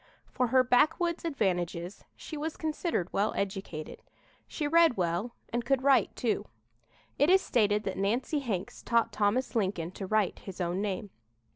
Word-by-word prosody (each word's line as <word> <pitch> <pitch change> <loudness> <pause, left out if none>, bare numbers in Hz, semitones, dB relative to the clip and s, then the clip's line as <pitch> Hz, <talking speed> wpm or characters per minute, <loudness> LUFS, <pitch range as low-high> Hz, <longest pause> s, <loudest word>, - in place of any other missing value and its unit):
For 250 -1 +1
her 255 +2 +4
backwoods 330 +8 +2
advantages 180 - -2
she 315 - -8
was 310 +1 -4
considered 310 - -2
well 205 +2 +1
educated. 190 -5 -4 0.5
She 300 - -3
read 330 -4 +5
well 180 +6 -1 0.2
and 240 0 0
could 260 +1 +1
write, 275 -1 +4
too. 230 -3 -1 0.7
It 290 +4 +4
is 380 +1 +7
stated 210 -3 +2
that - - -3
Nancy 240 +9 0
Hanks 210 -8 -4
taught 235 -1 +1
Thomas 215 +6 0
Lincoln 185 -6 -1
to 190 0 -6
write 215 -1 +1
his 190 -2 -9
own 180 +2 -1
name. 200 -1 -3
220 Hz, 155 wpm, -30 LUFS, 190-275 Hz, 0.7 s, is